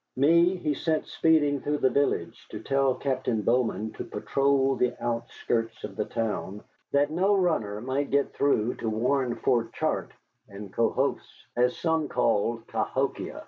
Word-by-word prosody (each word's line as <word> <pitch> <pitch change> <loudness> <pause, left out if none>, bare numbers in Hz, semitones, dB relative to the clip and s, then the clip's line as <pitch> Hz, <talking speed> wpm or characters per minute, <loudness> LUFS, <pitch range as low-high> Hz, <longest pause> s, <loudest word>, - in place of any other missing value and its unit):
Me 170 +7 +4
he 150 -5 -1
sent 155 +2 -1
speeding 150 -4 +2
through 150 +1 -1
the 130 - +3
village 140 -11 -1
to 105 - -7
tell 135 +2 +1
Captain 130 -5 -1
Bowman 110 -2 +1
to - - -6
patrol 135 -1 +1
the 125 -1 0
outskirts 115 -1 -2
of 100 -2 -6
the 105 - -1
town, 105 -2 -3 0.3
that 145 +1 +2
no 190 +5 +2
runner 155 - 0
might 135 +3 -2
get 140 0 +1
through 125 -4 +1
to 115 - -4
warn 125 +3 0
Fort 120 -2 0
Chartres - - -2 0.3
and 100 -1 -9
Cohos, 130 +4 +1 0.3
as 125 +1 +2
some 160 -2 0
called 115 -1 0
Cahokia. - - -2
130 Hz, 150 wpm, -27 LUFS, 115-145 Hz, 0.3 s, Me